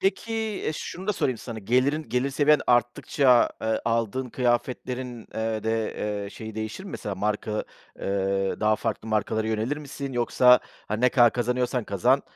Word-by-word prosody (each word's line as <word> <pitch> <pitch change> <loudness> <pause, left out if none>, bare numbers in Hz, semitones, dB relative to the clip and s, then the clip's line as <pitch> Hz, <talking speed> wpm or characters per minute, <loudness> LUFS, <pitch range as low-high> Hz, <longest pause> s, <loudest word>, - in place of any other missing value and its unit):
Peki, 210 +4 0 0.3
e, 155 - 0
şunu 185 +4 -6
da 210 - +2
sorayım 130 - -1
sana, 115 -1 -7
gelirin 130 +8 +1
gelir 125 +3 0
seviyen 145 +2 +4
arttıkça, 120 +1 +3
eee, 110 0 0
aldığın 115 +2 -1
kıyafetlerin, 125 0 -2
eee, 110 -1 -2
de, 110 0 -1 0.3
eee, 100 - -7
şeyi 110 0 -8
değişir 110 - -5
mi? 195 - -8
Mesela 100 - -4
marka, 105 +2 -2 0.3
eee, 95 0 0
daha 110 0 +3
farklı 110 0 -3
markalara 110 +1 0
yönelir 110 +6 -1
misin? 140 -2 -6
Yoksa, 125 +1 +5 0.3
hani, 110 +1 -2
ne 125 - +5
kadar 120 -2 +5
kazanıyorsan 125 0 0
kazan, 125 +8 +2
120 Hz, 160 wpm, -26 LUFS, 110-130 Hz, 0.3 s, Yoksa